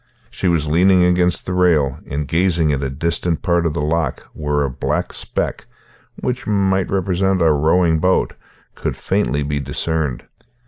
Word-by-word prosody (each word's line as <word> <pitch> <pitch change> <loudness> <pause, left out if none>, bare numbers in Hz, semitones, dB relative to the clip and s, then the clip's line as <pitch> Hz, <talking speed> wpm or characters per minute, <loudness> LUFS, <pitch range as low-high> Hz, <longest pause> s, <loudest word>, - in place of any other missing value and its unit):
She 95 - -2
was 85 -4 +2
leaning 90 +4 +4
against 90 -1 +2
the 90 - -3
rail, 80 -7 +2
and 70 +1 -3
gazing 85 -2 +2
at 70 - -1
a 70 - -2
distant 85 +4 -2
part 85 -2 +2
of 75 - -3
the 75 - -1
loch 75 -3 -1
where 75 -1 -1
a 70 - -1
black 60 - -2
speck, - - -4 0.5
which 125 0 -4
might 95 -2 +1
represent 95 0 +1
a 80 -2 +4
rowing 80 +2 +3
boat, 90 +3 +1 0.4
could - - -4
faintly 70 +4 0
be 70 0 -2
discerned. 75 0 -2
85 Hz, 165 wpm, -19 LUFS, 75-90 Hz, 0.5 s, leaning